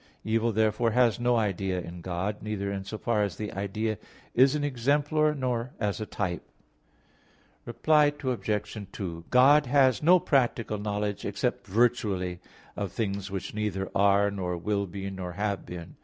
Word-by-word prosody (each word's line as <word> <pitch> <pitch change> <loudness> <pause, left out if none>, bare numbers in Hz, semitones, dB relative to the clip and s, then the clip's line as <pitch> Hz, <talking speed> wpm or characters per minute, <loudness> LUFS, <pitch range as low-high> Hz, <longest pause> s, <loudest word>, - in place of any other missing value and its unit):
Evil, 115 +1 +1
therefore, 110 +2 +2
has 120 0 +3
no 120 0 +2
idea 95 -4 0
in 85 0 -8
God, 95 +4 -3
neither 100 -2 -3
in 100 -1 -4
so 105 +3 -6
far 110 -1 0
as 100 -1 -2
an 105 -1 -3
idea 105 +2 -2 0.3
is 130 +3 +5
an 150 - -1
"exemplar" 145 +3 +1
nor 125 -2 -2
as 105 0 -1
a 105 - -4
"type." 90 -2 -3 1.3
Reply 150 +5 +3 0.2
Obj. 105 -5 -2
2: 85 -5 -6
God 140 +3 +6
has 130 -2 +4
no 180 +4 +6
practical 120 - +1
knowledge, 105 0 -2
except - - -2
virtually, 100 -5 +1 0.4
of 100 -3 -3
things 100 -3 -3
which 95 -1 -5
neither 105 -3 -2
are, 100 +1 +4
nor 90 -3 -3
will 100 +3 -1
be, 95 +2 -6
nor 90 -2 -6
have 100 +1 -2
been. 85 -2 -8
105 Hz, 155 wpm, -28 LUFS, 100-120 Hz, 1.3 s, God